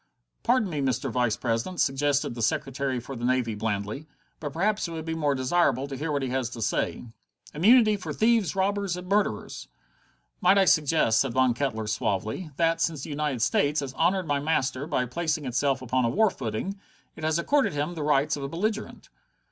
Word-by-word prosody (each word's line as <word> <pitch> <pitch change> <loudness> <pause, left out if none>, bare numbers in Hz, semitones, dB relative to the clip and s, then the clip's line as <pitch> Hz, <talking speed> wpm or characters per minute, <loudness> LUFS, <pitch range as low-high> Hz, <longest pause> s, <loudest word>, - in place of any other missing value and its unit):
"Pardon 240 -3 +2
me, 155 -5 -3
Mr. 130 -2 -1
Vice 120 -4 +1
president," 120 +10 -2
suggested 140 -1 +1
the 120 - -6
Secretary 130 +3 -1
for 130 +3 -8
the 120 - -7
Navy 125 -2 +1
blandly, 105 +6 -3 0.3
"but 145 -2 -5
perhaps 205 +6 0
it - - -8
would 160 -1 -5
be 165 - -2
more 150 -3 0
desirable 135 0 +1
to 140 - -6
hear 150 +4 -3
what 140 -2 -1
he 130 - -2
has 130 -2 -1
to 120 - -8
say." 110 +2 -1 0.5
"Immunity 215 +6 +5
for 170 -5 -6
thieves, 220 +1 +2
robbers, 195 -1 0
murderers!" 180 - -1 0.7
"Might 200 - +5
I 195 - +5
suggest," 155 -8 +3
said 135 -4 -1
Von 130 -1 +3
Kettler 115 -4 -2
suavely, 110 - -2
"that, 165 -1 +2
since 155 -5 -1
the - - -6
United 145 -5 -1
States 145 +4 +2
has 135 -2 -5
honored 180 +5 +1
my 145 -2 0
master 140 -2 -1
by 135 -5 0
placing 155 +3 -2
itself 130 +1 0
upon 130 +1 0
a 115 - +2
war 215 - +3
footing, 130 - -4 0.4
it 160 - -10
has 160 0 +1
accorded 275 - +1
him 145 +4 -2
the 165 - -6
rights 150 0 +2
of 145 - -7
a 140 - -4
belligerent?" 215 +7 -3
145 Hz, 195 wpm, -26 LUFS, 125-170 Hz, 0.7 s, Immunity